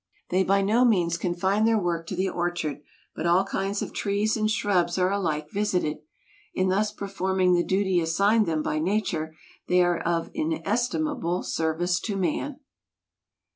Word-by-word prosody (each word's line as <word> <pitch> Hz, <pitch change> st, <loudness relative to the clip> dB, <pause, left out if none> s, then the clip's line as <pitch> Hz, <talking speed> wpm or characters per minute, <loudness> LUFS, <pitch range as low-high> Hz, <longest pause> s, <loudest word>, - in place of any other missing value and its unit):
They 185 Hz, +1 st, +2 dB
by 195 Hz, +1 st, +2 dB
no 220 Hz, +5 st, +3 dB
means 180 Hz, -8 st, +3 dB
confine 190 Hz, +5 st, 0 dB
their 225 Hz, 0 st, +3 dB
work 170 Hz, -4 st, -2 dB
to 185 Hz, -, -4 dB
the 190 Hz, +2 st, 0 dB
orchard, 175 Hz, -5 st, -2 dB, 0.3 s
but 170 Hz, -, -2 dB
all 175 Hz, +3 st, +4 dB
kinds 195 Hz, +1 st, -2 dB
of -, -, -7 dB
trees 205 Hz, +2 st, 0 dB
and 215 Hz, -1 st, 0 dB
shrubs 200 Hz, -6 st, +1 dB
are 185 Hz, 0 st, +2 dB
alike 155 Hz, -6 st, -2 dB
visited. 185 Hz, -7 st, -1 dB, 0.6 s
In 185 Hz, 0 st, +1 dB
thus 205 Hz, +3 st, +1 dB
performing 190 Hz, -2 st, 0 dB
the 175 Hz, 0 st, +3 dB
duty 190 Hz, -1 st, +1 dB
assigned 200 Hz, +7 st, +2 dB
them 155 Hz, -2 st, 0 dB
by 155 Hz, -, -1 dB
Nature 160 Hz, -3 st, -1 dB, 0.3 s
they 180 Hz, 0 st, +4 dB
are 175 Hz, -1 st, +1 dB
of 170 Hz, -1 st, -1 dB
inestimable 255 Hz, -, -1 dB
service 170 Hz, +2 st, 0 dB
to 200 Hz, +1 st, -3 dB
man. 230 Hz, -, -2 dB
185 Hz, 160 wpm, -26 LUFS, 175-205 Hz, 0.6 s, all